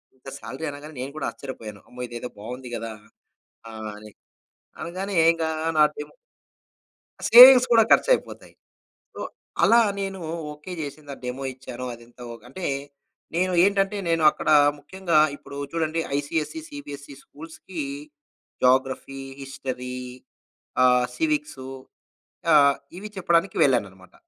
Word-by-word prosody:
ఇంత 130 - -19
సాలరీ 130 +7 -7
అనగానే 145 +2 -9
నేను 135 +2 -5
కూడా - - -2
ఆశ్చర్యపోయాను. 115 -4 -9
అమ్మో! 125 0 -10
ఇదేదో 120 +1 -6
బాగుంది 125 +3 -7
గదా! 115 0 -5 0.8
ఆహ్, 110 -1 -7
అని 105 0 -12 0.7
అనగానే 190 +3 -5 0.2
ఇగ 165 -1 -5 0.4
నా - - +8
డెమో 150 0 -8 1.2
సేవింగ్స్ 255 +2 +10
కూడా 225 -1 +7
ఖర్చుయిపోతాయి. - - +2 0.6
సో, - - -8 0.4
అలా 235 +1 +6 0.2
నేను 195 -1 -4 0.3
ఓకే, 150 +5 -10
జేసింద 145 0 -7
డెమో 130 +2 -4
ఇచ్చాను. 125 -1 -8
అదంత 120 +1 -18
ఓకే 115 - -13
అంటే 180 +5 -5 0.7
నేను 185 +1 +1
ఏంటంటే 200 +1 +1
నేను 165 -1 +1
అక్కడ - - -6 0.3
ముఖ్యంగా 170 +1 0 0.2
ఇప్పుడు 140 - -12 0.2
చూడండి 165 0 -1 0.2
ఐసీఎస్సీ, 150 - -2
సీబీఎస్సీ 145 - -9
స్కూల్స్‌కి 165 +2 -9 0.8
జాగ్రఫీ, 130 +1 +1 0.2
హిస్టరీ 130 -2 -6 0.9
ఆహ్, 125 0 +5
సివిక్సు 300 - -2 0.9
ఆహ్, 140 -2 +6 0.2
ఇవి 210 +3 -7
చెప్పడానికి 175 0 +1
వెళ్ళానన్నమాట. 100 -8 0
145 Hz, 115 wpm, -24 LUFS, 125-185 Hz, 1.2 s, సేవింగ్స్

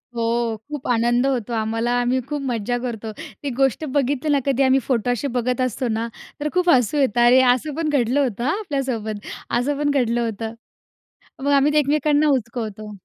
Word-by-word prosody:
हो, 230 -1 0
खूप 295 -3 -6
आनंद 240 +1 +2
होतो 245 -4 -1
आम्हाला. 225 +1 -1
आम्ही 245 +2 +1
खूप 295 -1 -2
मज्जा 235 +1 -1
करतो. 225 -2 -5 0.3
ती 285 - -1
गोष्ट 270 +3 +2
बघितली 285 +2 0
ना, 285 - +3
कधी 275 -1 +2
आम्ही 265 0 +4
फोटो 245 -2 +1
असे 245 +4 -1
बघत 250 +1 0
असतो 255 0 -1
ना, 225 +1 -1 0.3
तर 300 +1 -1
खूप 360 0 +2
हसू 255 -1 +3
येतं. 245 -4 +2
अरे, 250 +2 +7
असं 280 +4 -4
पण 320 -1 -1
घडलं 265 -2 +1
होतं 235 -3 -2
हां 305 +9 +1
आपल्यासोबत, 245 - -3 0.3
असं 285 +3 -1
पण 290 - +2
घडलं 240 -4 +1
होतं. 225 +1 -5 0.9
मग 285 - +1
आम्ही 280 +1 +4
ते 300 - +3
एकमेकांना 300 +1 +2
उचकवतो. 220 -3 -4
250 Hz, 185 wpm, -22 LUFS, 230-285 Hz, 0.9 s, अरे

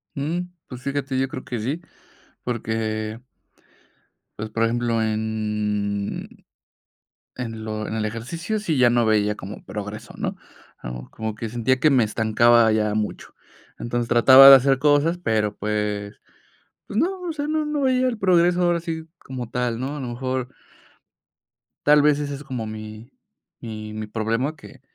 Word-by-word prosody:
Mm, 155 +6 -1 0.3
pues 125 -1 -9
fíjate, 140 -1 -2
yo 135 - +1
creo 130 - -7
que 120 -3 -4
sí, 140 +10 -3 0.6
porque 110 -2 -3 1.2
pues, 110 0 -4
por 115 +1 -1
ejemplo, 115 0 +1
en 105 -2 -2 0.9
en 115 -3 -5
lo 110 0 -4
en - - -4
el 110 - -1
ejercicio 165 - -3
sí 160 -9 -1
ya 120 -1 +5
no 120 -1 +3
veía 105 -1 +2
como 100 +1 -9
progreso, 105 +1 -7
¿no? - - -3 0.4
A - - -11
lo 60 - -4
mejor 60 0 -9
como 110 -1 -4
que 110 0 -5
sentía 120 +3 0
que 155 - +5
me 130 -5 +4
estancaba 115 +1 +4
ya 105 -1 +1
mucho. 105 -1 -4 0.4
Entonces, 120 0 -2
trataba 130 +3 +9
de 135 - +13
hacer 135 0 +2
cosas, 150 +4 +3
pero 110 -8 0
pues 105 -1 -2 0.7
pues, 205 - -5
no, 370 +4 0
o 350 -2 -3
sea 295 -1 -3
no, 310 0 0
no 300 -1 -2
veía 255 -1 +2
el 240 -3 -2
progreso 180 -2 +3
ahora 175 -1 +2
sí 160 -1 -5
como 125 -3 -6
tal, 120 -2 -1
¿no? 135 +3 -3
A - - -5
lo 130 - -4
mejor 130 +1 -3 1.4
tal 150 0 +7
vez 150 0 +4
ese 145 -1 -3
es 145 - -9
como 125 -4 -4
mi 110 +2 -8 0.5
mi 110 -2 -7
mi 110 0 -5
problema 115 +7 -1
que - - -15
120 Hz, 165 wpm, -23 LUFS, 110-145 Hz, 1.4 s, de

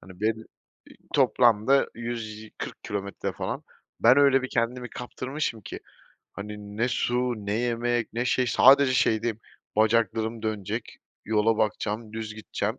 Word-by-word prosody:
hani, 90 +1 -14
ben 110 +1 0 0.7
toplamda 120 +4 +4
140 110 -2 -6
kilometre, 100 -1 -4
falan, - - -4 0.4
ben 125 +3 +6
öyle 140 -2 +5
bir 130 - -3
kendimi 125 +1 -1
kaptırmışım 130 -1 -4
ki, - - -7 0.5
hani, 105 0 -8
ne 120 +3 +1
su 125 0 0
ne 100 - -1
yemek 120 +1 0
ne 120 +2 -1
şey, 125 +1 +1
sadece 135 +2 +6
şeydeyim, 115 -2 +1 0.4
"Bacaklarım 110 0 +1
dönecek, 110 +1 -4 0.3
yola 110 +1 +2
bakacağım, 110 +1 -1
düz 110 -1 -5
gideceğim." 110 - -3
115 Hz, 125 wpm, -26 LUFS, 110-120 Hz, 0.7 s, ben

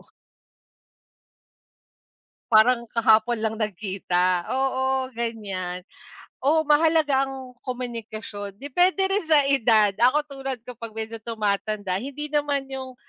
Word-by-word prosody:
O - - -25 2.4
Parang 235 +2 +5
kahapon 225 0 +3
lang 220 0 -1
nagkita, 185 -4 0
oo, 265 0 0
ganyan. 200 -6 -4 0.6
Oo, 305 +4 +2
mahalaga 300 -2 +3
ang 265 -1 -8 0.2
komunikasyon, 225 -4 -6
depende 365 +7 +2
rin 395 -3 0
sa 310 -2 +5
edad. 230 -6 +3
Ako, 255 +5 +4
tulad 270 -4 -6
ko 245 -1 -10
'pag 230 -2 -8
medyo 225 +1 -5
tumatanda, 210 -3 -2
hindi 285 +6 -6
naman 290 -2 -1
yung 260 -1 -6
245 Hz, 110 wpm, -24 LUFS, 215-275 Hz, 2.4 s, Parang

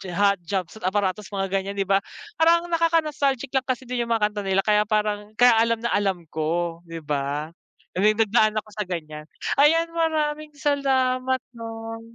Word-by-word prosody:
Hot 200 -1 +3
Jumpsuit 185 +3 -4
Apparatus, 200 +1 -1
mga 195 -1 -3
ganyan, 195 +1 -6
di 200 - 0
ba? 195 0 +2 0.4
Parang 340 +1 +4
nakaka-nostalgic 305 -6 +1
lang 265 -1 0
kasi 255 0 -1
din 250 0 -4
yung - - -5
mga 215 -2 +2
kanta 210 - -5
nila 195 0 +2
kaya 210 -1 +3
parang 210 -1 -1
kaya 245 -1 +6
alam 230 0 +3
na 235 - 0
alam 195 -4 0
ko. 165 +2 -1
Di 165 -1 -7
ba? 145 +2 -2 0.5
I - - 0
mean, 210 +2 +4
nagdaan 220 0 +3
ako 215 0 -3
sa 210 -2 -4
ganyan. 155 -3 -6 0.3
Ayan, 330 +3 +4
maraming 305 -2 -1
salamat 260 -3 +1
'no. 225 -1 -7
215 Hz, 175 wpm, -24 LUFS, 195-265 Hz, 0.5 s, kaya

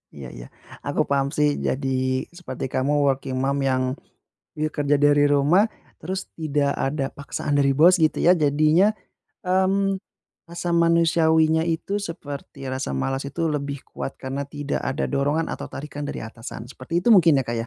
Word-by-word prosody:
Iya 70 -3 -8
iya. - - -9 0.4
Aku - - 0
paham 140 -1 +2
sih. 150 0 +4 0.2
Jadi 135 +1 -1 0.5
seperti 175 -6 -6
kamu 135 +3 +1
working 135 -1 -1
mom 140 +1 0
yang, 130 -1 +1 0.7
ya, 155 0 0
kerja 145 0 +1
dari 145 0 +4
rumah, 145 +9 +4 0.3
terus 185 +4 -3 0.2
tidak 145 -2 +1
ada 135 0 -1
paksaan 145 +1 -4
dari 140 -1 +3
bos, 175 +4 +6
gitu, 155 -1 +2
ya. 175 - +7
Jadinya, 155 +9 +3 0.5
mmm, 190 +1 +2 0.5
rasa 170 +1 -6
manusiawinya 160 -1 +3
itu 170 +4 -2
seperti 145 -7 -7
rasa 130 - -3
malas 135 - -2
itu 165 +3 -2
lebih 140 -2 -3
kuat 135 - -5
karena 135 +2 -4
tidak 145 0 -4
ada 135 - -1
dorongan 145 +3 0
atau - - -5
tarikan 145 0 -6
dari 145 - -5
atasan. 115 +1 -8
Seperti 155 +7 -3
itu 240 - 0
mungkin 165 -10 +6
ya, - - -3
Kak, 120 - -1
ya. - - -12
145 Hz, 165 wpm, -23 LUFS, 135-165 Hz, 0.7 s, ya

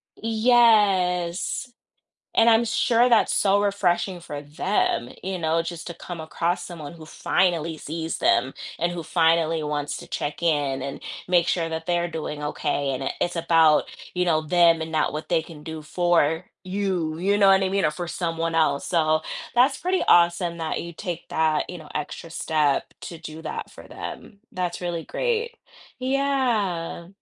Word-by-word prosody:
Yes, 215 -4 +2 0.6
and 230 +1 +5
I'm 230 +1 +5
sure 235 +1 +3
that's 235 -3 +4
so 200 0 +3
refreshing 185 -3 0
for 145 -3 -7
them, 150 - -1
you 190 0 -3
know, 165 0 +1
just 165 -1 -6
to 170 - -6
come 170 0 -8
across 170 +2 -2
someone 160 -4 -8
who 160 -2 -12
finally 165 -2 0
sees 160 +1 -4
them 130 +3 +2 0.3
and 175 +1 0
who 175 - -5
finally 165 -1 +2
wants 145 -1 -2
to - - -9
check 145 +3 -4
in 145 -5 +1
and 140 +1 -6 0.2
make 175 -1 +3
sure 165 -2 0
that 160 0 -5
they're 175 -1 +1
doing 150 -2 -5
okay, 145 -1 -1
and 130 - -4
it - - -1
it's 175 - 0
about, 165 -2 +4 0.3
you 180 0 +1
know, 155 -3 +2
them 170 0 +4
and 160 0 -5
not 155 -1 +1
what 155 +1 -5
they 165 -2 +2
can 160 -3 -12
do 160 -1 -6
for 165 0 +1 0.2
you, 185 -4 -2
you 200 +4 +1
know 200 -1 +6
what 195 0 +5
I 190 - +1
mean, 195 0 +1
or 155 - +3
for 175 +3 -5
someone 165 -1 -2
else. 145 -3 +2
So 155 -2 +2 0.3
that's 265 +3 +4
pretty 370 +1 0
awesome 170 0 +4
that 160 -1 -2
you 170 - -7
take 175 +1 -6
that, 155 -1 +1
you 180 - -7
know, 155 -2 -12
extra 150 +2 -5
step 150 -4 0
to 170 - -7
do 160 0 -9
that - - -5
for - - -13
them, 205 - -8
that's 180 -1 -3
really 175 -2 -3
great 470 -1 -1 0.4
yeah. 245 -11 0
170 Hz, 175 wpm, -24 LUFS, 160-190 Hz, 0.6 s, know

